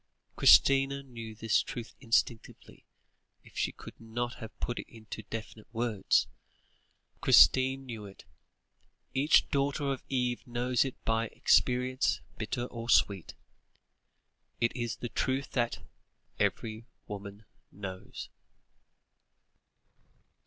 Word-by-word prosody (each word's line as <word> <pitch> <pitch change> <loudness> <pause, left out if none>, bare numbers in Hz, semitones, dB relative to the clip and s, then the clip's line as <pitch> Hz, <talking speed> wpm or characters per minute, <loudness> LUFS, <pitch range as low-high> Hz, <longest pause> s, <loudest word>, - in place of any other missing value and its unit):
Christina 135 0 +5
knew 115 -4 -9
this 110 0 +2
truth 120 -2 -7
instinctively, 115 -2 -1 0.6
if - - -18
she - - 0
could - - -12
not 120 +2 -3
have 110 -1 -10
put 120 - -2
it - - -8
into 110 -1 -9
definite 110 0 -8
words; 115 - +1 1.0
Christina 130 +1 +6
knew 115 -5 -7
it; 95 - -14 0.9
each 140 +4 +4
daughter 140 0 0
of 130 - -7
Eve 125 -2 0
knows 120 0 +1
it 135 - -4
by 115 0 +1
experience 125 +3 +2 0.2
bitter 120 +3 -3
or 120 -1 -7
sweet 100 -6 +3 1.2
it 115 0 +1
is 120 -2 -2
the 120 - -6
truth 130 +3 -1
that 120 -2 -1 0.6
"every 110 0 -1 0.2
woman 100 +1 -8 0.3
knows"! 95 -2 -7
120 Hz, 110 wpm, -30 LUFS, 110-130 Hz, 1.2 s, Christina